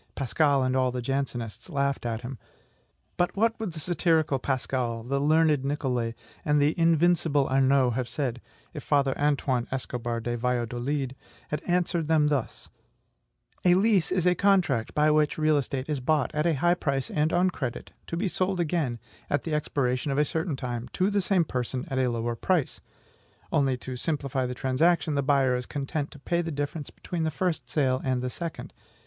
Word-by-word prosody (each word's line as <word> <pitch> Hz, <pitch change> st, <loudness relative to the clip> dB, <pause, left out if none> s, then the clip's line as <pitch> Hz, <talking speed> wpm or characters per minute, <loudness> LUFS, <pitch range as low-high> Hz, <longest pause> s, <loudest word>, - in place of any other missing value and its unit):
Pascal 140 Hz, 0 st, +2 dB
and 130 Hz, 0 st, 0 dB
all 130 Hz, -1 st, +2 dB
the 125 Hz, -, -3 dB
Jansenists 125 Hz, -, -3 dB
laughed 140 Hz, -5 st, -1 dB
at 115 Hz, -1 st, -3 dB
him. 125 Hz, -1 st, -7 dB, 0.8 s
But 175 Hz, +2 st, 0 dB
what 225 Hz, +2 st, +2 dB
would 215 Hz, -6 st, -3 dB
the 155 Hz, -, -7 dB
satirical 160 Hz, -4 st, +1 dB
Pascal, 125 Hz, -3 st, -2 dB
the 140 Hz, +3 st, -1 dB
learned 155 Hz, -1 st, +3 dB
Nicole, 130 Hz, -5 st, -1 dB, 0.3 s
and 150 Hz, 0 st, +2 dB
the 145 Hz, +2 st, +3 dB
invincible 165 Hz, -3 st, +3 dB
Arnaud 135 Hz, -1 st, +3 dB
have 120 Hz, 0 st, -2 dB
said, 125 Hz, -5 st, -3 dB, 0.3 s
if -, -, -6 dB
Father 140 Hz, -2 st, +2 dB
Antoine 140 Hz, -4 st, +1 dB
Escobar 120 Hz, -3 st, -3 dB
de 120 Hz, +1 st, -2 dB
Valladolid 125 Hz, +3 st, -1 dB, 0.3 s
had 150 Hz, -, -2 dB
answered 175 Hz, -2 st, +1 dB
them 155 Hz, -2 st, +3 dB
thus: 140 Hz, -5 st, -2 dB, 1.0 s
"A 180 Hz, -1 st, +5 dB
lease 195 Hz, -3 st, +3 dB
is 180 Hz, -2 st, +1 dB
a 180 Hz, -, +5 dB
contract 175 Hz, -, +2 dB
by 150 Hz, 0 st, +4 dB
which 150 Hz, -1 st, +2 dB
real 155 Hz, 0 st, +3 dB
estate 135 Hz, -1 st, -2 dB
is 150 Hz, -3 st, -1 dB
bought, 145 Hz, +1 st, +1 dB
at 150 Hz, +2 st, +1 dB
a 165 Hz, -, +2 dB
high 175 Hz, +5 st, +3 dB
price 140 Hz, -6 st, -2 dB
and 155 Hz, +1 st, +1 dB
on 180 Hz, +1 st, +3 dB
credit, 130 Hz, -8 st, -5 dB, 0.2 s
to 165 Hz, -, -3 dB
be 195 Hz, -, -1 dB
again -, -, +1 dB, 0.7 s
sold, -, -, -23 dB, 0.3 s
at 145 Hz, -, 0 dB
the 160 Hz, -, -3 dB
expiration 140 Hz, -2 st, 0 dB
of 135 Hz, -, -1 dB
a 150 Hz, -, +4 dB
certain 160 Hz, 0 st, -2 dB
time, 125 Hz, -2 st, -4 dB
to 190 Hz, +3 st, +1 dB
the 205 Hz, 0 st, +2 dB
same 185 Hz, -2 st, +2 dB
person, 125 Hz, -1 st, -3 dB
at 130 Hz, -, -1 dB
a 130 Hz, -1 st, +2 dB
lower 115 Hz, 0 st, -2 dB
price; 170 Hz, +3 st, 0 dB, 0.7 s
only, 135 Hz, -3 st, +2 dB
to 130 Hz, 0 st, -6 dB
simplify 135 Hz, -2 st, -1 dB
the 125 Hz, -, -4 dB
transaction, 155 Hz, +6 st, +2 dB
the 140 Hz, -, +1 dB
buyer 135 Hz, -2 st, +3 dB
is 125 Hz, 0 st, -4 dB
content 145 Hz, +1 st, -3 dB
to -, -, -12 dB
pay 170 Hz, +5 st, -1 dB
the 165 Hz, -, -4 dB
difference 145 Hz, +1 st, -4 dB
between 175 Hz, -2 st, -5 dB
the 160 Hz, -, +1 dB
first 160 Hz, -6 st, -2 dB
sale 130 Hz, -2 st, +1 dB
and 130 Hz, -2 st, 0 dB
the 125 Hz, -, -2 dB
second. 170 Hz, +2 st, -6 dB
140 Hz, 185 wpm, -27 LUFS, 130-160 Hz, 1.0 s, A